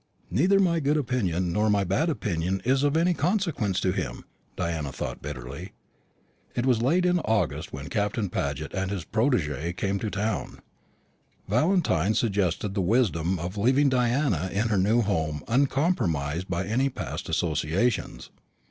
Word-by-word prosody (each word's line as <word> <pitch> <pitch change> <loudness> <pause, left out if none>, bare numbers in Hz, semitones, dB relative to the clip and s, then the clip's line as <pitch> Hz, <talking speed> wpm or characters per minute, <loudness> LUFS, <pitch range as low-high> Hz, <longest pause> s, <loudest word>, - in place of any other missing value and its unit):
"Neither 180 - +4
my 170 -4 +3
good 150 +1 +1
opinion 95 - 0
nor 105 +3 +2
my 100 -1 +3
bad 100 - +1
opinion 95 - -1
is 130 +2 +3
of 145 +2 +2
any 175 +2 +3
consequence 165 - 0
to 95 - +2
him," 85 - -4 0.3
Diana 80 -5 -2
thought - - -5
bitterly. 70 +5 -7 0.8
It 120 - 0
was 125 -4 +3
late 170 +9 +2
in 180 0 +3
August 110 -7 -1
when - - -7
Captain 105 +1 -1
Paget 75 -3 -3
and 95 0 -1
his 95 -5 -4
protégé 85 - 0
came 100 0 -1
to 110 - -2
town. 105 - -2 0.9
Valentine 120 - +2
suggested 100 -2 0
the 100 - 0
wisdom 95 -4 +1
of 90 +5 -5
leaving 130 +7 +3
Diana 125 - +1
in 110 +4 0
her 105 - +2
new 110 +6 +3
home 80 -7 -1
uncompromised 115 - +1
by 90 +1 -1
any 130 +6 +1
past - - -6
associations. 85 +8 -1
105 Hz, 150 wpm, -26 LUFS, 85-130 Hz, 0.9 s, Neither